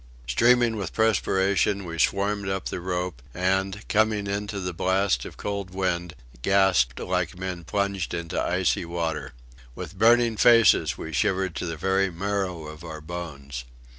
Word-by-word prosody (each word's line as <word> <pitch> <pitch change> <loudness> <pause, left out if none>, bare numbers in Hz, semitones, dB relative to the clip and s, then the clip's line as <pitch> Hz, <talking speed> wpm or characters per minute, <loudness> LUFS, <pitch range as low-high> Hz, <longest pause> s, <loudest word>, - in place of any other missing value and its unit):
Streaming 120 - +3
with 95 -5 -4
perspiration, 100 -2 +2
we 85 -1 -6
swarmed 100 +3 +1
up 95 0 -2
the - - -4
rope, 90 -6 -3
and, 95 +3 0
coming 110 -1 +2
into 100 +1 -3
the 90 -1 -3
blast 95 -6 +1
of - - -9
cold 100 -2 -4
wind, 90 -2 -1 0.3
gasped 95 -8 +3
like - - -2
men 90 -1 -5
plunged 100 -1 -1
into 85 -1 -3
icy - - +1
water. 85 -4 -3 0.4
With 95 - -8
burning 115 0 +4
faces 105 - +5
we 80 - -7
shivered 95 -4 +1
to - - -3
the 80 -1 -4
very 95 +3 +1
marrow 95 -2 -3
of 75 +2 -10
our 80 -2 -7
bones. 75 -6 -7
95 Hz, 150 wpm, -25 LUFS, 85-100 Hz, 0.4 s, faces